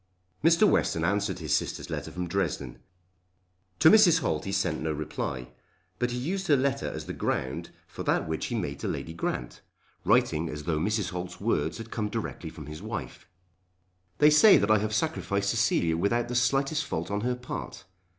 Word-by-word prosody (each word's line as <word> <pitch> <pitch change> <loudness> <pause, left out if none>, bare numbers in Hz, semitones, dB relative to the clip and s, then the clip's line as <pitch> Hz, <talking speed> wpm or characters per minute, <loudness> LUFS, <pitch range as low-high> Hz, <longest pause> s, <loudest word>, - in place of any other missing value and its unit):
Mr. 165 +6 +5
Western 80 - +1
answered 100 0 0
his 80 -4 0
sister's - - -3
letter - - -4
from 90 0 -4
Dresden. 80 -9 -2 1.0
To 160 - +7
Mrs. 180 -7 +6
Holt - - -1
he 95 - -3
sent 95 -5 0
no 80 0 -1
reply: 70 -4 -4 0.5
but 125 - +1
he 120 - -3
used 190 +9 -2
her 145 - +5
letter 135 0 0
as - - -5
the - - -5
ground 65 0 -2 0.2
for - - -9
that - - 0
which 80 0 -2
he - - -3
made - - -3
to - - -3
Lady 80 - -4
Grant, 65 -6 -4 0.4
writing 80 +2 +2
as 75 -1 -6
though 75 0 0
Mrs. 105 +2 0
Holt's 90 0 -6
words 115 +4 0
had 115 0 -9
come 105 -2 -2
directly 105 -6 -4
from 80 -2 -10
his 75 +3 -8
wife. 110 +2 -6 0.9
"They 150 +1 +6
say 190 +7 +8
that 100 +2 +2
I 110 - +5
have 105 +1 -2
sacrificed 100 -9 0
Cecilia 100 -8 +2
without 115 +7 0
the 125 - -3
slightest 135 +5 +2
fault - - -4
on 105 0 -1
her 125 +2 0
part. 125 +1 -7
100 Hz, 190 wpm, -28 LUFS, 80-125 Hz, 1.0 s, say